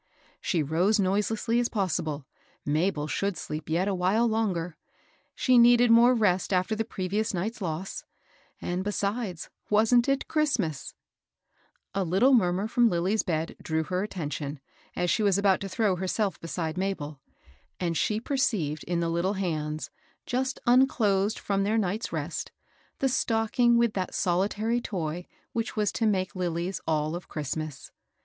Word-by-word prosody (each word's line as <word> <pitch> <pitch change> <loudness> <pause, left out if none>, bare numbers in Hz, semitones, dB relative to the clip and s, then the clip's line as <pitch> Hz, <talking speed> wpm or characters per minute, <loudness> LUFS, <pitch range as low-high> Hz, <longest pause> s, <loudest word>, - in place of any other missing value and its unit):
She 165 -4 0
rose 180 +9 +2
noiselessly 210 +4 +1
as 240 - +1
possible; 155 - -2 0.2
— - - -33
Mabel 155 +1 0
should 195 +2 -1
sleep 155 +1 -6
yet 175 +4 +1
a 200 - +1
while 190 +6 +2
longer; 185 -7 -1 0.6
she 255 -2 +4
needed 240 0 +6
more 240 +2 +7
rest 190 -5 +1
after 185 +4 +1
the 225 - 0
previous 210 0 -2
night's 215 +6 -3
loss; 170 +1 -4 0.6
and 180 +1 -2
besides, 205 -3 -3 0.2
wasn't 225 +4 +4
it 275 0 0
Christmas 225 - -1 1.0
f 195 - 0
A - - +2
httle 195 +10 +4
murmur 185 -2 +2
from 240 +1 +3
Lilly's 185 +4 +1
bed 165 -1 -2
drew 160 0 -1
her 180 +3 -2
attention, 150 -7 -4 0.4
as 175 -1 +1
she 225 - +1
was 200 -2 +3
about 200 -1 +3
to 195 - -4
throw 205 -1 +1
herself 190 +2 -1
beside 165 0 -3
Mabel, 155 -7 -3 0.6
and 170 -2 -1
she 210 +6 +1
perceived 215 - -1
in 175 0 -1
the 165 0 0
Uttle 185 +4 0
hands, 155 -5 -3 0.3
just 260 +1 -1
unclosed 220 -5 +3
from 195 -1 -1
their 215 +3 +1
night's 210 +1 -1
rest, - - -4 0.5
the 270 - +1
stocking 235 -1 +2
with 235 -2 +2
that 185 -2 -3
solitary 205 +6 0
toy 175 -5 -4 0.3
which 230 0 -2
was 210 -3 +1
to 225 - 0
make 190 -1 0
Lilly's 175 0 -2
all 155 -1 0
of 175 - -7
Christmas. 155 -1 -5
195 Hz, 155 wpm, -27 LUFS, 170-225 Hz, 1.0 s, more